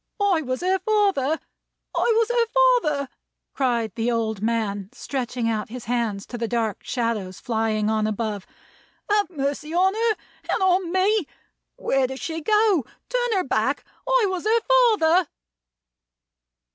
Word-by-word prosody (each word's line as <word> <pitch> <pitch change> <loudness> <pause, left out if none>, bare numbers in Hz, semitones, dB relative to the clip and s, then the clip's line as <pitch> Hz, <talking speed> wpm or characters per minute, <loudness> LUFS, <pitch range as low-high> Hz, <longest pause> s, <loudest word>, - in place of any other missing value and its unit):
"I 395 -5 +3
was 255 -1 -3
her 375 +1 +1
father! 380 -8 +1 0.6
I - - +1 0.2
was - - -15
her 475 -1 +2
father!" 475 - +2 0.4
cried 235 -6 0
the 230 +4 -1
old 220 -3 -1
man, 210 -3 -1
stretching 250 -3 -3
out 215 -2 -1
his 245 +1 -8
hands 225 -4 -1
to 240 - -7
the 230 - -1
dark 225 -3 -2
shadows 225 -7 -2
flying 220 -2 0
on 215 0 +1
above. 215 -2 -3 0.6
"Have 415 -4 +3
mercy 295 0 -3
on 380 +2 +4
her, 445 0 +1 0.4
and - - +1
on 365 -2 +2
me! 375 -1 +2 0.5
Where 270 -1 +1
does 265 +1 -7
she 325 0 -4
go? 420 - +3 0.3
Turn 485 -4 +1
her 370 - +1
back! 265 +3 0 0.2
I - - +4
was 370 -2 -3
her 455 +2 +3
father!" 420 -9 +4
280 Hz, 145 wpm, -24 LUFS, -, 0.6 s, on